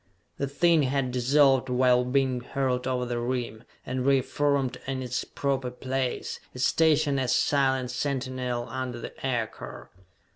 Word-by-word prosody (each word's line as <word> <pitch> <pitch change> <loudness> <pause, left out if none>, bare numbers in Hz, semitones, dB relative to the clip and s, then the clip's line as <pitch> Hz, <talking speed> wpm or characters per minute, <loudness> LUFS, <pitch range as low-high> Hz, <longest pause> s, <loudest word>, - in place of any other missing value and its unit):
The 140 - 0
thing 165 +3 +3
had 135 -1 0
dissolved 135 +1 +3
while 125 0 +4
being 130 0 +1
hurled 130 0 -1
over 125 -1 0
the 120 -1 -2
rim, 120 -2 -3 0.2
and 130 0 -2
reformed 135 0 +1
in 130 -1 -2
its 125 0 -2
proper 135 -2 -2
place, 130 0 -3 0.2
its 125 - +1
station 155 -3 +3
as 130 -1 +1
silent 130 -3 +2
sentinel 125 -2 -2
under 130 -2 -4
the - - -7
aircar! 115 - -4
130 Hz, 140 wpm, -27 LUFS, 125-135 Hz, 0.2 s, while